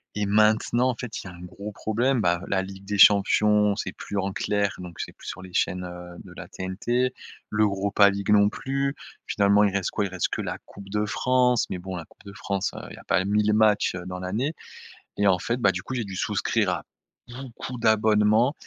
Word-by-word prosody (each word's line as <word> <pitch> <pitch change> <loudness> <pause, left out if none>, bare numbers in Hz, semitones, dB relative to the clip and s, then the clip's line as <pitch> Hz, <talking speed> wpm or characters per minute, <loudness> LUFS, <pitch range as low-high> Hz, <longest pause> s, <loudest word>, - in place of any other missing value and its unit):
et 105 -1 -1
maintenant, 110 +4 +3
en - - -6
fait, 120 -2 -6
il - - -9
y - - -7
a - - -13
un 85 - -13
gros 100 +4 -8
problème, 120 +4 0
bah, 85 -1 +1
la 95 -1 +1
Ligue 95 0 -10
des 105 0 -3
Champions, 105 +1 +5
c'est 110 - -4
plus 100 - -6
en 95 0 -2
clair, 100 0 -1
donc 90 -2 -9
c'est - - -5
plus - - -14
sur 95 - -7
les 90 -1 -12
chaînes, 90 +1 0
heu, 90 0 -9
de - - -13
la - - -8
TNT. 120 +7 -1 0.4
L'Europa 100 -1 +3
League 100 +1 -4
non 100 -1 +5
plus. 135 +4 -2 0.3
Finalement, 100 0 +3
il 100 -2 +1
reste 100 -2 0
quoi? 105 - -1
Il - - -4
reste 95 -1 -2
que - - -3
la - - -4
Coupe 100 -1 -12
de 105 +1 0
France, 125 +2 +2
mais 90 - -3
bon 95 +1 -6
la 85 - -7
Coupe - - -23
de 100 - -9
France, 100 -1 -2
heu, - - -6
il - - -9
y - - -17
a - - -13
pas 95 - +2
1000 105 +1 +2
matchs, 105 -3 +3
heu, 90 0 -6
dans 90 0 -6
l'année, 110 - -2 0.6
et 100 - +2
en 90 -2 +4
fait, 120 +7 -2
bah 100 - +4
du 90 - -5
coup, 130 - -6
j'ai 120 - -1
dû 95 -1 -7
souscrire - - 0
à - - -3 0.5
beaucoup 125 0 -8
d'abonnements, 110 +2 +3
105 Hz, 230 wpm, -25 LUFS, 95-110 Hz, 0.6 s, Champions